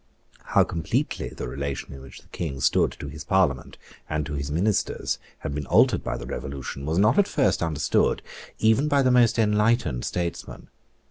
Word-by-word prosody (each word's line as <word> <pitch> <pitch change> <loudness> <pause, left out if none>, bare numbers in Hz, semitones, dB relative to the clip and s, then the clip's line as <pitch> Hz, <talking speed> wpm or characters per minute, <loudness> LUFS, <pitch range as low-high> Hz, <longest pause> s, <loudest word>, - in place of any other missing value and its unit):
How - - +4
completely 80 -1 -2
the - - -6
relation 70 +2 -5
in 70 - -10
which 65 - -12
the - - -25
King 70 -6 -4
stood - - +2
to 70 - -8
his 75 +1 -8
Parliament 70 -6 0 0.3
and 75 -1 -1
to 75 - -5
his 70 -1 -3
ministers 95 +8 0 0.2
had - - -5
been 75 -1 -4
altered - - +4
by - - -3
the - - -7
Revolution 70 +2 -6
was 80 +2 0
not 105 - +4
at 200 - +4
first 135 - +1
understood 80 -3 +1 0.3
even 110 +6 +3
by 140 -2 +3
the 130 - +3
most 120 -2 +4
enlightened 105 - +2
statesmen. 85 -2 -4
80 Hz, 180 wpm, -25 LUFS, 70-105 Hz, 0.3 s, How